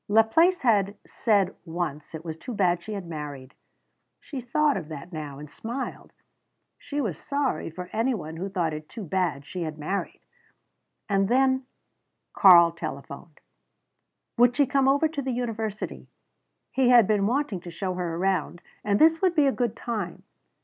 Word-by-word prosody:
Laplace 225 - +4
had 205 -4 +2
said 200 -5 +1
once 160 -3 -4
it 160 +1 -8
was 160 -1 -4
too 230 +9 -7
bad 175 -3 +2
she 215 - -7
had 200 -3 -5
married. 145 -5 -7 0.7
She 275 -4 -7
thought 290 +4 +2
of 150 - -4
that 155 +3 -8
now, 150 -3 -6
and 150 +1 -9
smiled. 235 - -6 0.7
She 290 - -4
was 200 - -2
sorry 280 - -1
for 180 +3 -7
any 235 +3 +1
one 160 -5 -7
who 190 +4 -4
thought 175 -5 -1
it 155 0 -7
too 225 - -7
bad 170 -5 -1
she 180 - -6
had 155 -2 -4
married! 175 +7 -3 0.9
And 195 -1 +1
then 260 +1 +2 0.7
Karl 175 -4 +8
telephoned. 155 -1 -8 1.0
Would 245 +1 +5
she 285 - +5
come 275 0 +2
over 285 +4 +4
to 305 -2 -4
the 265 - -4
university? 225 -3 -4 0.6
He 260 -2 +3
had 240 -3 +7
been 205 -1 +2
wanting 255 -5 0
to 175 - -9
show 185 +2 -3
her 175 -2 -3
around, 180 -1 -1 0.2
and 200 -1 +2
this 325 +4 +5
would 370 -2 +2
be 295 - +4
a 275 - +4
good 240 -4 -1
time. 210 -7 -4
200 Hz, 170 wpm, -26 LUFS, 170-250 Hz, 1.0 s, Karl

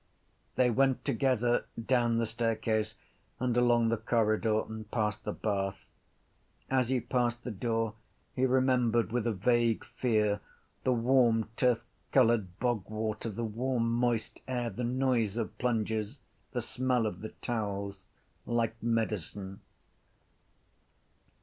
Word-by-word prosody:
They 125 -1 +4
went 135 +2 +2
together 120 -1 +2
down 120 0 +2
the 115 - +2
staircase 110 -1 -1 0.4
and 125 -2 0
along 120 -1 +4
the 115 - +1
corridor 110 -1 +2
and 110 -1 -8
past 105 -1 -1
the - - -1
bath. 95 -3 -3 0.8
As 130 -2 +2
he 130 -1 +2
passed 120 0 -1
the 125 - -4
door 115 +1 -1 0.4
he 130 +1 +3
remembered 125 -3 +2
with 120 -1 0
a - - +2
vague 115 +2 +2
fear 105 -4 +1 0.4
the 130 - +2
warm 120 -2 +3
turfcoloured 115 -4 +1
bogwater, 110 -2 -2
the 115 +2 -3
warm 115 +1 0
moist 120 -2 0
air, 120 -2 -1
the 120 +5 -4
noise 120 -4 +1
of 115 -3 -3
plunges, 110 0 -1 0.3
the 125 - -1
smell 125 -1 0
of 95 -4 -3
the 110 - -5
towels, 100 -4 -3 0.4
like 115 -1 0
medicine. 105 -4 -2
115 Hz, 125 wpm, -31 LUFS, 110-125 Hz, 0.8 s, They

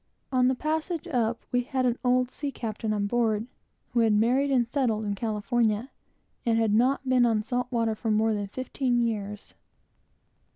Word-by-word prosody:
On 255 -1 +3
the 260 - +2
passage 315 +4 -2
up, 235 -6 -1
we 245 - +2
had 260 0 -1
an 245 -1 +1
old 250 0 +2
sea 285 -2 -4
captain 220 -3 -4
on 205 -1 0
board, 220 -1 +1 0.5
who 240 - +1
had 225 -2 +4
married 245 +7 +3
and 250 -4 +2
settled 235 -5 0
in 205 - -1
California, 220 +2 0 0.5
and 230 -2 +2
had 225 -2 +2
not 260 +4 +2
been 255 -1 +4
on 225 -3 +2
salt 245 +2 -2
water 230 -3 0
for 220 +1 -4
more 220 +1 +2
than 205 -1 -2
fifteen 255 +2 -1
years. 210 -3 -3
235 Hz, 175 wpm, -27 LUFS, 220-255 Hz, 0.5 s, had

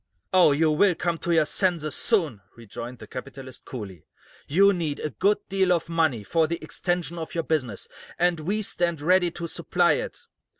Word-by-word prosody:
"Oh, 180 -5 +6
you 155 +2 +3
will 180 +4 +3
come 170 -1 -2
to 175 - -2
your 160 -2 +4
senses, 165 -3 0
soon," 160 - +1
rejoined 120 +2 -8
the 110 - -11
capitalist, 130 +2 -9
coolly. 100 - -8 0.4
"You 200 +7 +5
need 160 -5 -2
a 150 - -3
good 200 +9 +2
deal 190 -1 +1
of 170 -2 +1
money 160 -10 +1
for 160 +8 +1
the 170 +1 -2
extension 170 0 -2
of 160 - -7
your 165 - 0
business, 130 -12 -2 0.3
and 175 -1 +2
we 200 +7 -1
stand 170 -4 0
ready 180 +3 +3
to 170 0 -6
supply 170 0 +1
it. 150 - -2
165 Hz, 180 wpm, -25 LUFS, 145-175 Hz, 0.4 s, Oh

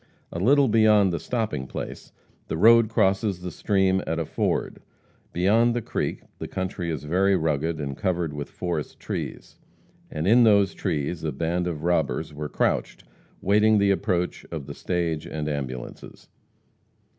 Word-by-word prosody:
A 85 - -4
little 140 +7 +4
beyond 105 -4 +4
the 85 - -2
stopping 105 - -2
place - - -7 0.4
the - - -3
road 115 +4 +6
crosses 95 -3 +1
the 90 0 -5
stream 95 +2 +1
at 80 - -1
a 80 - -1
ford. - - -2 0.5
Beyond 110 +7 +3
the 120 - -1
creek - - -3 0.2
the - - -5
country 95 -2 -4
is 80 -3 -3
very 95 +6 +2
rugged, 80 -1 -1
and 70 -2 -4
covered 85 -2 -1
with 75 -1 -6
forest 85 -5 -4
trees. - - -6 0.5
And 75 +1 -4
in 120 +5 +6
those 100 -3 +4
trees 80 -2 -3
a 80 - -1
band 85 +3 -1
of 80 -4 -4
robbers 85 -2 0
were 75 0 -5
crouched, - - -1 0.4
waiting 105 +2 +4
the 100 -1 +3
approach 90 -3 -1
of 80 -5 -5
the 70 - -7
stage 85 -2 -2
and 75 -1 -4
ambulances. 65 -4 -6
90 Hz, 155 wpm, -25 LUFS, 80-100 Hz, 0.5 s, road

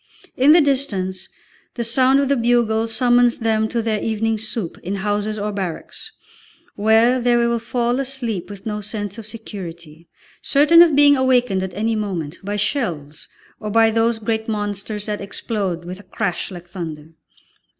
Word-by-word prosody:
In 270 +4 +5
the 335 +2 +7
distance 200 -10 -1 0.5
the 235 - -2
sound 260 +4 +3
of 280 - +1
the 280 - +2
bugle 230 -2 +1
summons 245 +1 +3
them 220 -1 +1
to 230 +1 -2
their 215 -2 -1
evening 225 0 -1
soup 215 -4 -4
in 190 +3 -4
houses 205 +2 -2
or 210 0 -2
barracks, 190 -5 -6 0.6
where 225 +4 +4
they 240 0 +2
will 235 0 +1
fall 240 +2 -1
asleep 250 -9 -3
with 200 -1 -10
no 210 -1 -3
sense 205 0 -5
of 220 - -8
security, 170 -7 -9 0.3
certain 305 +4 +5
of 330 -4 +6
being 285 0 +6
awakened 250 -7 +2
at 190 -1 -5
any 225 +2 0
moment 180 -7 -4
by 205 +1 -3
shells, 170 - -3 0.3
or 215 - -5
by 225 +1 +4
those 230 +1 +1
great 220 0 -2
monsters 205 -1 -4
that 210 -1 -3
explode 195 -4 -3
with 180 +2 -7
a 205 - -17
crash 190 -6 -2
like 175 -2 -10
thunder. 160 -4 -7
220 Hz, 165 wpm, -20 LUFS, 195-240 Hz, 0.6 s, the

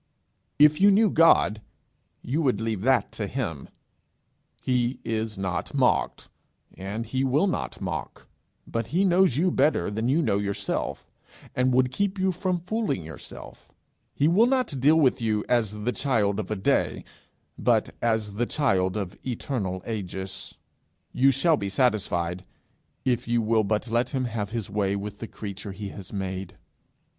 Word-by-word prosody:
If 150 +3 +5
you 200 - +8
knew 205 0 +4
God, 110 -10 +4 0.6
you 145 +7 -1
would 130 -9 +1
leave 110 -3 -2
that 125 -1 +2
to 105 - -4
him. 95 - -4 0.9
He 125 0 0
is 110 -2 -2
not 95 -4 -3
mocked, - - +1 0.5
and 100 +5 -5
he 130 +4 -1
will 135 +7 +2
not 190 - -2
mock. 85 -8 -5 0.4
But 115 -1 -3
he 175 +9 +1
knows 180 -7 +4
you 180 +3 +2
better 135 - +2
than 110 +4 -1
you 160 +5 +3
know 105 -6 +1
yourself, 100 -1 -3 0.4
and 125 +1 +2
would 125 0 +3
keep 200 +7 -1
you 190 0 +2
from 180 0 -1
fooling 180 - -2
yourself. 80 -2 -10 0.4
He 145 - +3
will 200 +8 +5
not 250 - 0
deal 145 +5 +5
with 130 -5 +3
you 110 -2 0
as 105 -3 0
the 125 - +1
child 110 -4 +1
of 105 - -4
a 110 - -1
day, 95 - 0 0.6
but - - +2
as 110 -3 0
the 120 +4 -1
child 95 -10 +1
of 100 -3 -4
eternal 110 -7 -3
ages. 95 -3 -5 0.6
You 135 +2 +4
shall 150 +5 +3
be 100 -2 -3
satisfied, 95 -7 0 0.6
if 125 -2 0
you 120 0 +2
will 110 0 +2
but 105 +3 -1
let 120 +2 +1
him 130 -2 -1
have 110 -4 -3
his 115 -2 -4
way 100 -1 0
with 100 +1 -6
the 115 - -6
creature 100 -1 -7
he 100 +1 -6
has 95 -2 -10
made. 95 -2 -5
115 Hz, 160 wpm, -26 LUFS, 100-135 Hz, 0.9 s, you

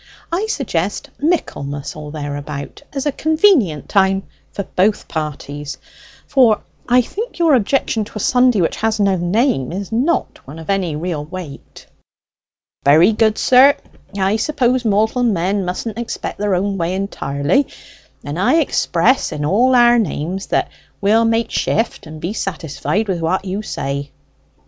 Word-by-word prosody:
I 380 +6 0
suggest 205 - -2
Michaelmas 145 - -2
or 150 -1 -8
thereabout 145 -1 -6
as 275 0 -3
a 290 - +2
convenient 310 - +2
time 195 -1 +2 0.3
for 200 - -4
both 205 +3 0
parties; 150 -2 -5 0.5
for 240 -6 +3 0.3
I 250 +1 +6
think 445 - -6
your 335 -3 +4
objection 235 -2 +1
to - - -15
a - - -3
Sunday 245 -1 +3
which 165 - 0
has 220 0 0
no 200 -2 +3
name 175 - +1
is 195 +3 -5
not 260 +10 0
one 145 +4 -9
of 165 +4 -4
any 185 -6 0
real 160 -1 -3
weight." 160 -3 -9 1.0
"Very 160 +9 +6
good, 215 0 +2
sir. 265 +3 +6 0.4
I 195 +2 +2
suppose 255 -1 +1
mortal 220 +3 +1
men 195 -3 +1
mustn't 210 +5 -4
expect 235 - -5
their 205 -2 +1
own 195 +1 -1
way 170 +2 -1
entirely; 180 - 0 0.6
and 145 +4 -5
I 240 +10 +3
express 260 - +2
in 145 - -3
all 245 +10 +3
our 240 -1 +6
names 185 0 -3
that - - 0 0.3
we'll 220 +3 +3
make 225 0 +1
shift 225 -7 -1
and 155 0 -9
be 175 +6 -3
satisfied 180 +1 -2
with 180 -4 -2
what 185 +4 0
you 195 +2 -3
say." 140 -7 -4
195 Hz, 150 wpm, -18 LUFS, 165-240 Hz, 1.0 s, I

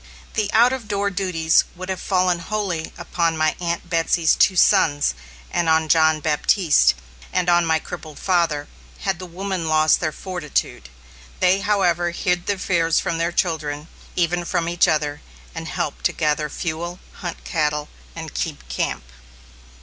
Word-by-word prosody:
The 215 -2 -1
out 240 +3 +5
of 250 -5 -5
door 200 -1 0
duties 180 -4 +2
would 185 +1 -7
have 190 -1 -3
fallen 185 -2 +1
wholly 180 -3 -3
upon 165 -2 -1
my 155 0 +2
Aunt 170 0 -3
Betsy's 165 -1 +2
two 190 - +4
sons 155 - +4 0.4
and 170 -2 +1
on 160 0 +3
John 160 0 +4
Baptiste 150 - +3 0.4
and 180 - 0
on 175 -1 +4
my 160 0 +3
crippled 160 -3 -8
father, 165 -6 +1 0.3
had 190 -3 -1
the 185 - -7
women 185 -1 -4
lost 155 0 +4
their 155 -2 -1
fortitude. 155 - -3 0.5
They, 185 +1 +4
however, 180 -4 +1
hid 175 0 -1
their 205 - 0
fears 165 -3 +1
from 165 -1 -2
their 170 +1 0
children, 155 -3 -2 0.3
even 175 0 +1
from 170 -1 -1
each 175 0 +3
other, 150 -1 0 0.3
and - - -6
helped - - -3
to - - +3
gather 150 0 0
fuel, 170 +3 -4 0.2
hunt 175 -2 -6
cattle, 150 -2 -1 0.3
and - - -7
keep 60 - -4
camp. 60 - -2
170 Hz, 155 wpm, -22 LUFS, 155-185 Hz, 0.5 s, out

